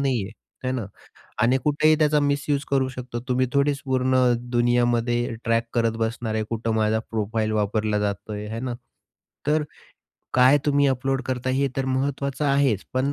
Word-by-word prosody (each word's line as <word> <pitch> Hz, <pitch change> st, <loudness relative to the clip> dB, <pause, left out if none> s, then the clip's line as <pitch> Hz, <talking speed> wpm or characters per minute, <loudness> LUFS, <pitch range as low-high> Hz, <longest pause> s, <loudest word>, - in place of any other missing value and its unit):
नाहीये 125 Hz, -8 st, 0 dB, 0.3 s
आहे 130 Hz, -, 0 dB
ना, 120 Hz, -4 st, -2 dB, 0.6 s
आणि 125 Hz, +3 st, +4 dB
कुठेही 155 Hz, +1 st, +4 dB
त्याचा 150 Hz, -1 st, +3 dB
मिस्यूज 145 Hz, 0 st, 0 dB
करू 135 Hz, -1 st, +2 dB
शकतो. 125 Hz, -2 st, -6 dB
तुम्ही 130 Hz, 0 st, +2 dB
थोडीच 140 Hz, 0 st, +2 dB
पूर्ण 130 Hz, -1 st, +1 dB, 0.4 s
दुनियामध्ये 120 Hz, 0 st, +1 dB
ट्रॅक 115 Hz, 0 st, +2 dB
करत 115 Hz, -1 st, +1 dB
बसणार 115 Hz, 0 st, -2 dB
आहे, 110 Hz, -, 0 dB
कुठे 115 Hz, 0 st, -2 dB
माझा 110 Hz, 0 st, +2 dB
प्रोफाइल 110 Hz, 0 st, -1 dB
वापरला 105 Hz, 0 st, 0 dB
जातोय 105 Hz, +1 st, -3 dB
आहे 105 Hz, -, -6 dB
हाय 115 Hz, -, -4 dB
ना 125 Hz, 0 st, -3 dB, 0.7 s
तर, 150 Hz, +1 st, +2 dB, 0.7 s
काय 130 Hz, +3 st, +6 dB
तुम्ही 145 Hz, -1 st, +3 dB
अपलोड 135 Hz, 0 st, 0 dB
करताय 130 Hz, 0 st, -1 dB
हे 140 Hz, +1 st, +1 dB
तर 135 Hz, -, 0 dB
महत्त्वाचं 140 Hz, +2 st, -1 dB
आहेच, 140 Hz, -7 st, +2 dB
पण 135 Hz, +2 st, +1 dB
125 Hz, 160 wpm, -24 LUFS, 115-140 Hz, 0.7 s, काय